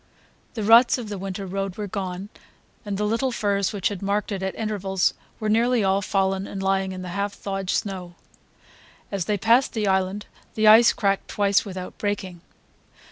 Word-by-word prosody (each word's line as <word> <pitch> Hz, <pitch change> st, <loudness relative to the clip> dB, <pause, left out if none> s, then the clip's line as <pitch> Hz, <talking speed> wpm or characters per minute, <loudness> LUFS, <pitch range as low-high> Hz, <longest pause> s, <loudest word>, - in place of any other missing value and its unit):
The 220 Hz, -, -3 dB
ruts 230 Hz, +5 st, +6 dB
of 235 Hz, -4 st, -6 dB
the 205 Hz, -2 st, -5 dB
winter 195 Hz, +1 st, -5 dB
road 195 Hz, 0 st, -3 dB
were 210 Hz, -, -3 dB
gone, 190 Hz, -1 st, -5 dB, 0.5 s
the 205 Hz, -1 st, -2 dB
little 230 Hz, +5 st, 0 dB
firs 200 Hz, -4 st, 0 dB
which 200 Hz, -4 st, -1 dB
had 200 Hz, -3 st, -6 dB
marked 200 Hz, +1 st, -1 dB
it 195 Hz, -2 st, -3 dB
at 190 Hz, 0 st, -3 dB
intervals 195 Hz, -4 st, 0 dB, 0.3 s
were 215 Hz, -, -2 dB
nearly 230 Hz, +1 st, +2 dB
all 195 Hz, +1 st, +2 dB
fallen 195 Hz, 0 st, 0 dB
and 195 Hz, -, -6 dB
lying 190 Hz, 0 st, +1 dB
in 185 Hz, 0 st, -6 dB
the 180 Hz, -, -6 dB
half 200 Hz, +3 st, -2 dB
thawed 195 Hz, -2 st, -5 dB
snow; 185 Hz, -4 st, -3 dB, 1.0 s
as 195 Hz, -4 st, -2 dB
they 210 Hz, -, 0 dB
passed 230 Hz, +6 st, +3 dB
the 220 Hz, -2 st, -1 dB
island 190 Hz, +2 st, 0 dB, 0.3 s
the 215 Hz, -, +1 dB
ice 225 Hz, +2 st, +8 dB
cracked 195 Hz, -1 st, 0 dB
twice 200 Hz, 0 st, +1 dB
without 185 Hz, -2 st, -7 dB
breaking. 190 Hz, -4 st, -3 dB
200 Hz, 180 wpm, -24 LUFS, 190-210 Hz, 1.0 s, ice